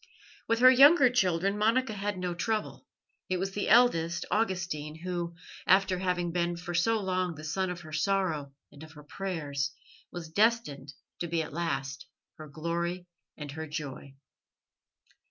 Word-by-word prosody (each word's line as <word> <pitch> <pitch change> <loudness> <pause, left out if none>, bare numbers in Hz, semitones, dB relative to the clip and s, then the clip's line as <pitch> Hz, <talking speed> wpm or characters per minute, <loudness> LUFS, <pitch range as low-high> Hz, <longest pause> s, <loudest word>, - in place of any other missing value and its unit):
With 230 - +2
her 255 0 +9
younger 275 0 +7
children 195 -3 +1
Monica 230 +2 +2
had 205 -1 -3
no 180 -1 -2
trouble; 215 +5 -3 0.4
it 185 - +1
was 190 +2 -2
the 205 +1 -2
eldest, 170 -8 +4
Augustine, 180 -8 -1
who, 175 -2 -3 0.3
after 190 -1 +4
having 180 -2 -1
been 175 0 -1
for 175 0 -6 0.3
long 185 -2 -1
the 155 - -10
son 185 +4 -1
of 180 -1 -5
her 155 -2 -11
sorrow 160 -4 0 0.2
and 145 - -15
of 160 -1 -11
her 150 -1 -13
prayers, 145 -6 -3 0.4
was 170 -2 -7
destined 200 - +1 0.3
to 170 - -2
be 165 -1 0
at 150 - -9
last 135 -5 -3 0.3
her 155 -1 -9
glory 170 +4 -3 0.3
and 145 -2 -7
her 160 +2 -6
joy. 140 -2 -7
175 Hz, 155 wpm, -29 LUFS, 155-195 Hz, 0.4 s, her